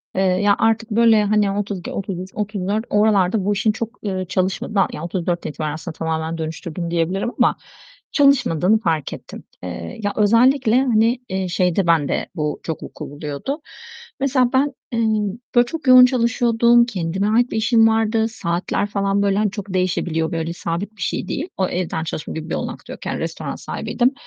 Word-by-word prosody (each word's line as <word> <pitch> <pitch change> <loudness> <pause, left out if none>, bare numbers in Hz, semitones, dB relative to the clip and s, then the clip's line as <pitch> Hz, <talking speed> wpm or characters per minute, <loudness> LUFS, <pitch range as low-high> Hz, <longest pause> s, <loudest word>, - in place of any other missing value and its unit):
eee, 190 - +1
ya 190 +2 +3
artık 225 0 +1
böyle 225 -1 +5
hani 205 -1 +2
32, 200 -3 -4
33, 190 -1 -4
34 210 +1 -2
oralarda 205 -2 +2
bu 205 - +2
işin 215 +2 +2
çok, 225 +1 -6
ııı, 185 -2 -2
çalışmadığını 190 +2 0
ya 150 - -6
34'ten 175 -1 -2
itibaren 150 0 -3
aslında 155 0 -7
tamamen 160 0 -2
dönüştürdüm 165 +1 -5
diyebilirim 180 +7 0
ama - - +4 0.6
çalışmadığını 235 - +3
fark 160 -8 -1
ettim. - - -10 0.2
Eee, 90 - -6
ya 205 - 0
özellikle 230 +3 +4
hani, 235 0 +2
eee, 190 -1 -2
şeyde 180 +1 +1
bende 160 -4 +1
bu 150 -2 -2
çok 160 -3 -4
vuku - - -8
buluyordu. 150 - -5 0.6
Mesela 260 -2 +2
ben, 275 +2 +2 0.2
eee, 230 - -1 0.6
böyle 240 0 +6
çok 310 +2 -6
yoğun 255 0 +9
çalışıyordum. 235 -1 +3
Kendime 190 -3 -2
ait 240 +3 +2
bir - - -2
işim 225 0 +4
vardı. 225 0 +2
Saatler 180 -2 -2
falan 200 0 0
böyle 200 -1 +2
hani 210 -1 +1
çok 200 -1 -7
değişebiliyor. 175 -3 0
Böyle 165 0 -2
sabit 180 +6 -4
bir - - -12
şey - - -2
değil. 310 - -3
O 190 - +1
evden 175 -3 -2
çalışma 160 -1 -5
gibi 160 +1 -6
bir - - -1
olanak - - -5
da - - -8
yok - - -11
yani - - -2
restoran - - -4
sahibiydim. 255 +2 -1
200 Hz, 175 wpm, -20 LUFS, 170-225 Hz, 0.6 s, yoğun